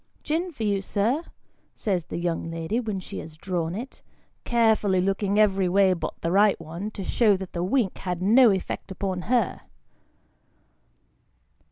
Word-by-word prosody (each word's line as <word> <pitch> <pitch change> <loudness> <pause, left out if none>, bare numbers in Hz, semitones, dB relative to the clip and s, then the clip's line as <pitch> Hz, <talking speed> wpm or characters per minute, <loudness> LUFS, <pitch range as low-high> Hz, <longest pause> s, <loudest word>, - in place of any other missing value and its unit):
" - - -36
Gin 335 +4 -1
for 255 -8 -6
you, 200 -2 +1
sir? 225 - 0 0.2
" - - -42
says 185 -7 -1
the - - -5
young 170 -1 -2
lady 165 +7 -2
when 215 -5 -3
she 185 - -7
has 155 0 -10
drawn 170 -1 -2
it: 245 +6 -7 0.4
carefully 220 -5 +3
looking 195 +2 0
every 195 -3 +3
way 190 0 +4
but 170 - -5
the 165 - -1
right 205 +2 +4
one, 165 +6 -6
to 205 -2 -7
show 210 0 +3
that 190 -1 -8
the 175 - -2
wink 200 0 0
had 180 -2 -3
no 230 +6 +6
effect 195 0 -2
upon 190 -1 -3
her. 240 -5 +1
195 Hz, 170 wpm, -25 LUFS, 180-220 Hz, 0.4 s, no